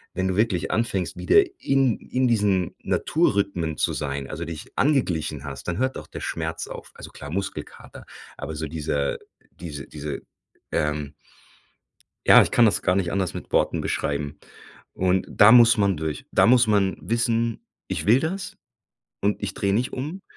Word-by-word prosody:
wenn 95 +1 0
du 95 - -1
wirklich 105 -5 +1
anfängst, 110 -6 -1
wieder 90 0 +5 0.2
in 135 -4 +2
in 130 0 0
diesen 100 -6 +1
Naturrhythmen 100 - 0
zu - - 0
sein, 70 -2 -4
also 85 +2 -5
dich 80 -2 -8
angeglichen 90 - 0
hast, 70 -1 -8
dann 85 - -2
hört 130 +1 0
auch - - -9
der - - -8
Schmerz 80 0 -3
auf - - -9
also - - -10
klar 75 - -9
Muskelkater. 95 +3 -6 0.3
Aber 80 - -6
so 80 +1 -4
diese 75 -2 -2 0.4
dieser 75 -6 -7
diese - - -24
diese, 75 -2 -6 0.5
ähm 75 -1 -1 1.1
ja, - - +9
ich - - -1
kann 120 - +5
das 110 - +2
gar 90 - +2
nicht 95 -3 0
anders 95 -3 -1
mit - - -8
Worten - - +2
beschreiben 70 0 -2 0.6
und 95 0 +1
da 105 +2 +7
muss 120 -1 +7
man 100 -4 +2
durch. 80 -1 -4
Da - - +5
muss 125 +1 +5
man 100 -2 +2
wissen: 115 0 0 0.2
„Ich - - -3
will 120 +6 +5
das 185 +4 -4 0.6
und 100 +1 0
ich 100 -2 -2
drehe 100 0 0
nicht 125 +4 0
um 155 +9 -5
95 Hz, 170 wpm, -24 LUFS, 80-115 Hz, 1.1 s, ja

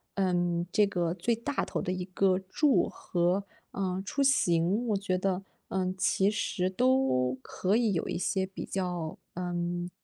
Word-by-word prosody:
嗯， 175 -2 +1
这 210 -1 +4
个 175 -3 0
最 190 +7 0
大 250 +5 -2
头 - - -3
的 180 - -2
一 180 -1 -3
个 185 0 +2
住 260 +9 +2
和， 180 +3 0 0.3
嗯， 190 -1 -2
出 275 +7 0
行 200 -3 +2
我 210 - +2
觉 185 -2 -1
得， 190 0 -1 0.3
嗯， 185 -1 0
其 195 +2 +2
实 185 -3 -1
都 190 - +2
可 190 +8 -1
以 225 -3 +2
有 165 - -1
一 - - -2
些 190 +1 0
比 190 - -7
较， 175 -4 -3 0.2
嗯， 175 0 -2
185 Hz, 175 characters per minute, -29 LUFS, 175-200 Hz, 0.3 s, 这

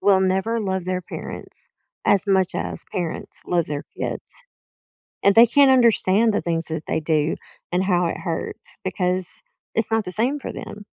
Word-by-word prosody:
will 195 -2 +4
never 190 +5 +1
love 190 -3 -2
their 185 0 -1
parents 175 - -9 0.4
as 200 0 +4
much 190 -2 +2
as - - -4
parents 175 -3 -4
love 170 -2 +1
their 145 0 -4
kids. - - -5 0.8
And 200 +1 +5
they 230 +1 +9
can't 275 +4 +5
understand 225 -3 +4
the - - +1
things 165 -1 -1
that 160 -1 -4
they - - 0
do 155 0 +1 0.4
and 180 +2 +1
how 180 -2 +2
it - - -3
hurts 170 -3 -5
because 185 -1 -1 0.3
it's 225 0 +1
not 225 0 +2
the 180 - -5
same 250 +9 0
for - - -6
them. 205 0 -8
190 Hz, 175 wpm, -23 LUFS, 175-220 Hz, 0.8 s, they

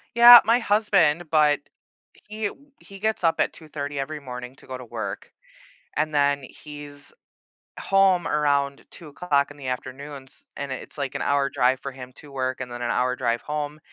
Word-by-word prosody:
Yeah, 240 0 +11
my 230 +2 +4
husband, 195 -8 +2
but 150 -2 +4 0.7
he 215 +1 -5
w 285 +7 -12
he 195 0 -13
gets 220 -1 -1
up 165 -1 +3
at - - +1
2:30 145 -3 -6
every 150 +3 -4
morning 125 -2 -8
to - - -16
go 130 - -5
to 125 - -10
work, 110 -4 -6 0.7
and 155 0 0
then 140 -1 +2
he's 145 +1 -10 0.7
home 195 -3 +3
around 140 -2 0
2:00 145 -2 -1
in 145 - -13
the 135 - -8
afternoons, 130 +2 -7
and 140 -1 -5
it's - - -8
like 140 -3 -4
an - - -3
hour 140 -1 +1
drive 130 -1 +2
for 140 - -6
him 130 -1 -10
to 145 -2 -13
work 130 -1 -2
and 125 -1 -7
then 120 - -7
an 120 -1 -2
hour 125 0 +1
drive 115 -1 -1
home, 150 0 -4
145 Hz, 180 wpm, -24 LUFS, 130-160 Hz, 0.7 s, Yeah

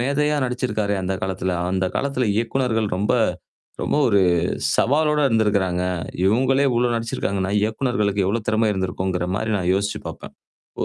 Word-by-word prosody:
மேதையா 150 +4 +1
நடிச்சிருக்காரே! 110 -5 -1
அந்த 95 +1 -1
காலத்துல. 95 -1 -2 0.2
அந்த 95 0 0
காலத்துல 135 -4 -1
இயக்குனர்கள் 115 -2 0
ரொம்ப 105 +5 +1 0.7
ரொம்ப - - 0
ஒரு 100 -4 +3 0.6
சவாலோட 150 +3 +2
இருந்திருக்கிறாங்க. 100 -5 +1 0.4
இவுங்களே 130 +7 +3
இவ்ளோ 120 0 +2
நடிச்சிருக்காங்கன்னா, 100 -4 -2
இயக்குனர்களுக்கு 105 -3 0
எவ்ளோ 110 +4 0
திறமை 110 0 +2
இருந்திருக்குங்கிறமாரி 95 +2 -2
நான் 90 0 0
யோசிச்சு 100 +1 -1
பாப்பேன். 80 - -10 0.5
ஓ - - +1
110 Hz, 125 wpm, -22 LUFS, 95-125 Hz, 0.7 s, ஒரு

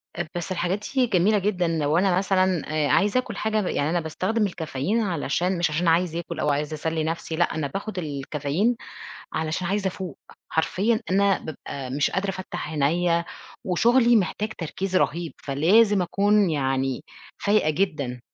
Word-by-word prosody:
أ 175 -1 -3
بس 175 +2 -4
الحاجات 185 +3 -1
دي 255 -2 +4
جميلة 205 +2 +3
جدًا 185 -3 0
لو 155 -1 +1
أنا 185 -1 +3
مثلًا 185 -3 +2 0.2
آآ، - - +1
عايزة 200 - +3
آكل 255 - -5
حاجة 215 0 0
ب - - -3
يعني 145 +2 0
أنا 175 +1 +1
باستخدم 185 +7 -1
الكافيين 170 - -1
علشان 175 0 0
مش 170 -2 +1
عشان 170 +3 0
عايزة 170 0 +2
آكل 170 -1 -6
أو 150 - +1
عايزة 150 +2 -1
أسلّي 160 +1 -2
نَفْسي، 165 0 -3
لأ، 175 0 +1
أنا 150 -3 -1
باخد 195 +6 -5
الكافيين 150 - -1 0.6
علشان 160 +3 -2
عايزة 200 0 0
أفوق، 185 -4 -5 0.3
حرفيًا 210 +7 +1
أنا 195 0 +3
بابقى 140 -3 -7
مش 145 +3 0
قادرة 195 +1 -1
أفتّح 180 -4 -5
عينيّا، 170 +3 +1 0.4
وشغلي 235 +6 +4
محتاج 210 +2 0
تركيز 185 +3 -3
رهيب، 165 0 0
فلازم 190 +9 +4
أكون 200 +2 +3
يعني 135 -1 -1 0.3
فايقة 205 -6 +2
جدًا. 145 -8 -1
175 Hz, 165 wpm, -24 LUFS, 155-200 Hz, 0.6 s, دي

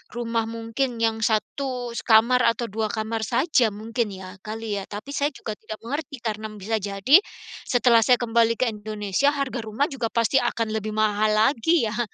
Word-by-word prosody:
rumah 230 -1 -1
mungkin 230 +3 -2
yang 225 -1 +1
1 245 +3 -1 0.2
kamar 235 +3 +5
atau 235 +1 -5
2 220 0 -1
kamar 220 +1 -3
saja 260 -5 +2
mungkin 220 0 -3
ya, 185 +1 -10
kali 215 -1 -4
ya. - - -7
Tapi 210 +7 -7
saya 285 - +1
juga 215 - -5
tidak 215 0 -8
mengerti, 285 +3 -4
karena 220 -1 -3
bisa 210 +2 -2
jadi 200 - +4 0.5
setelah 245 -2 +4
saya 250 - +6
kembali 230 0 +2
ke 255 - +2
Indonesia 210 +3 -2
harga 275 -3 -2
rumah 220 +7 -1
juga 250 -4 -2
pasti 230 +3 +2
akan 230 -2 -1
lebih 215 0 -3
mahal 215 0 +2
lagi 275 +7 +3
ya? 235 - -4
225 Hz, 175 wpm, -24 LUFS, 215-245 Hz, 0.5 s, saya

